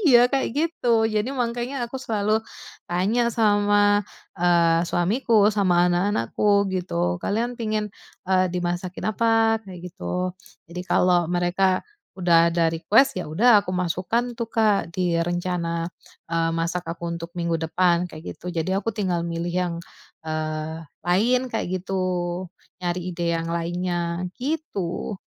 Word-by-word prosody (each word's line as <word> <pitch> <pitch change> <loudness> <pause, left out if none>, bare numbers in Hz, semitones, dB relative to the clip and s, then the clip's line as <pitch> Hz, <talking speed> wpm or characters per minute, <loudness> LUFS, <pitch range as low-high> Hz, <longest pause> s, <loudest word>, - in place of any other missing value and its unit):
iya 250 - +5
kayak 270 - +1
gitu 245 -8 +2
jadi 215 +1 0
makanya 240 +1 -2
aku 255 +3 -6
selalu 215 -2 0 0.5
tanya 210 +7 +1
sama, 205 -2 +3 0.4
eee, 170 -1 +4
suamiku 210 +3 +3
sama 180 -4 +3
anak-anakku 200 - +2
gitu 90 - -1
kalian 230 +4 -1
pingin, 215 -2 -2 0.3
eee, 185 0 +2
dimasakin 175 +1 -3
apa? 225 0 +3
Kayak 180 -2 -9
gitu. 185 -1 -3 0.4
Jadi 180 - -4
kalau 175 -2 +3
mereka 180 +2 +1 0.3
udah 170 -2 +4
ada 170 0 +2
request 205 +12 +3
ya 180 - -6
udah, 215 +6 +5
aku 200 - -5
masukkan 185 +7 -1
tuh, 235 -1 -4
Kak, 215 -5 +2
di 175 -2 +1
rencana, 175 -1 -1 0.5
eee, 165 0 +2
masak 170 +2 -1
aku 170 0 -4
untuk 170 0 -6
minggu 170 -1 -1
depan, 175 +2 +1
kayak 155 -1 -8
gitu. 180 - -8
Jadi 170 +1 -2
aku 205 +4 0
tinggal 185 -5 -1
milih 170 0 -3
yang, 180 -2 0 0.5
eee, 155 0 -3 0.2
lain 225 +8 +3
kayak 225 - -1
gitu, 190 0 -2 0.8
nyari 175 0 -1
ide 170 0 0
yang 165 - -4
lainnya, 175 +1 -2
gitu. 245 - -3
180 Hz, 135 wpm, -24 LUFS, 170-215 Hz, 0.8 s, iya